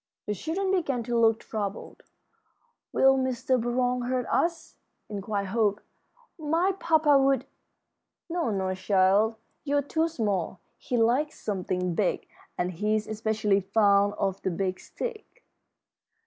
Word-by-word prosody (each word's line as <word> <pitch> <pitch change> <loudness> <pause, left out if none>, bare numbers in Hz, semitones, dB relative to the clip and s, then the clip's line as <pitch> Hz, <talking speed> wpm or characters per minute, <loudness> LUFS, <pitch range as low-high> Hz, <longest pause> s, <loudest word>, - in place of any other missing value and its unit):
The 210 - -1
children 355 - -2
began 280 -10 0
to 240 +1 -2
look 225 -1 +3
troubled. 205 -2 -5 0.9
"Will 270 0 +4
Mr. 260 -1 0
Burroughs 245 +1 0
hurt 255 -1 0
us?" 335 -1 -1 0.3
inquired 200 -1 -3
Hope. 210 -1 +1 0.6
"My 325 +5 +1
papa 310 -4 +4
would 270 -1 +2 0.4
" - - -58
"No, 340 -7 -1
no, 190 -3 -1
child, 195 +3 +3 0.3
you're 285 -1 +1
too 320 +3 0
small. 205 - -2 0.2
He 245 - -2
likes 250 +7 +1
something 180 -3 -2
big, 190 +1 -1 0.3
and 180 +1 -1
he's 210 +4 0
especially 215 -2 0
fond 200 0 +3
of 195 -1 -1
the - - -1
Big 185 +1 -2
Stick." 480 +1 -7
225 Hz, 130 wpm, -27 LUFS, 200-275 Hz, 0.9 s, Will